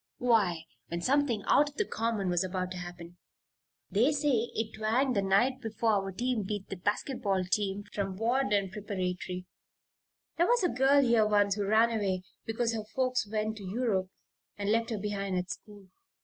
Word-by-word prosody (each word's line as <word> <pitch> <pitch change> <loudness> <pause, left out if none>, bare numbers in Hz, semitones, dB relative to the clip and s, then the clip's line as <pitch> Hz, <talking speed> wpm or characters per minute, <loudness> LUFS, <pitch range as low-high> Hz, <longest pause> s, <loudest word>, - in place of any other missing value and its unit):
"Why, 205 -9 +2 0.2
when 170 +1 -4
something 260 -5 +2
out 290 0 +4
of 290 - -19
the 430 - 0
common 225 - -1
was 175 0 +1
about 185 0 -3
to 185 - -5
happen. 175 -1 -9 0.7
They 235 +9 +4
say 275 -6 +1
it 220 -1 -2
twanged 240 +4 +1
the 200 - +3
night 240 +8 +2
before 225 -1 0
our 195 -2 0
team 240 +3 -1
beat 200 0 -4
the - - -4
basket 210 +7 -2
ball 195 -4 +1
team 195 +2 -1
from 195 -2 -2
Varden 215 -4 +1
Preparatory. 185 -3 -4 0.9
There 345 +1 +3
was 485 -2 +3
a 355 - +3
girl 270 +2 +4
here 235 -4 +4
once 205 -1 +3
who 200 -1 -2
ran 220 +3 +4
away 195 -5 -1 0.2
because 230 +1 0
her 220 -1 -3
folks 255 -4 +1
went 215 0 -1
to 205 - -9
Europe 195 -2 -1 0.5
and 205 0 -1
left 230 +1 +1
her 225 - -2
behind 200 -2 -2
at 180 +1 -3
school. 200 0 -10
210 Hz, 180 wpm, -30 LUFS, 195-240 Hz, 0.9 s, out